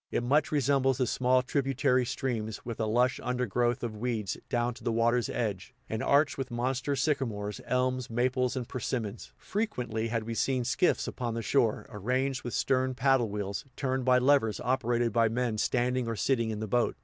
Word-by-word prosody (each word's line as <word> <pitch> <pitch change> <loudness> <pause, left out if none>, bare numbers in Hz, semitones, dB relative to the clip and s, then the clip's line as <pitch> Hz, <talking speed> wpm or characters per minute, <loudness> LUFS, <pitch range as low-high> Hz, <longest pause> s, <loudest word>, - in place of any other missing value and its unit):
It - - -1
much 145 +5 +2
resembles 135 -3 +2
the 130 - +2
small 125 +2 +2
tributary 130 -2 +1
streams, 110 -5 -3
with 115 -2 -5
a 110 - 0
lush 125 +3 +2
undergrowth 125 0 0
of 115 -2 -3
weeds 110 -3 -2
down 120 -1 0
to 115 - -14
the 115 - 0
water's 120 +1 +2
edge, 110 0 -3
and 110 - -3
arched 145 0 +3
with 130 -1 -3
monster 130 +3 -1
sycamores, 120 -8 -1
elms, 125 0 0
maples 125 +2 0
and 125 -3 -3
persimmons. 115 -4 -4
Frequently 125 - -2
had 115 -1 -1
we 115 +1 -4
seen 130 +2 0
skiffs 130 +8 +1
upon 120 -3 -3
the 115 - -3
shore, 115 -1 +1
arranged 125 +5 -1
with 120 - -4
stern 130 -1 +1
paddle 130 -3 +3
wheels, 100 -1 -3
turned 130 -1 -1
by 125 0 +5
levers 125 -5 +3
operated 120 -2 0
by 115 -1 +3
men 115 -1 -1
standing 125 +1 +1
or 115 - -2
sitting 115 0 +1
in 110 -1 -4
the 110 - -3
boat. 120 +4 +1
125 Hz, 185 wpm, -29 LUFS, 115-130 Hz, -, by